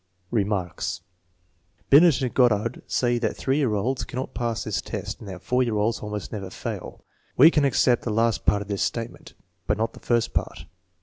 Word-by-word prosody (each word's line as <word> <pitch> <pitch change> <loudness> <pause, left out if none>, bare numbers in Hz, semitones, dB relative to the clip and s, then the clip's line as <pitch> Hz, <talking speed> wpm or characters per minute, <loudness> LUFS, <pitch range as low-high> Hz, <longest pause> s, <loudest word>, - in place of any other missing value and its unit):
Remarks. 100 -5 -1 0.9
Binet 150 -1 +7
and 125 - -2
Goddard 115 -3 +2
say 120 -1 +1
that 115 - -2
3 135 +1 0
year 130 -8 +1
olds 125 +6 -1
can - - -8
not 130 - -4
pass 120 -3 -2
this - - -2
test - - -5
and 100 - -9
that 95 -1 -8
4 125 +6 +1
year 115 -4 0
olds 110 +2 0
almost 105 -1 -5
never 100 -4 -5
fail. - - -7 0.3
We 155 +6 +8
can 150 -4 +2
accept 125 -2 +3
the - - -4
last 115 +1 +1
part 105 0 +3
of - - -17
this 100 -1 -2
statement, 115 0 -4 0.3
but - - +1
not 110 +1 -1
the - - -13
first 120 -1 0
part. 80 - -3
115 Hz, 195 wpm, -25 LUFS, 105-125 Hz, 0.9 s, We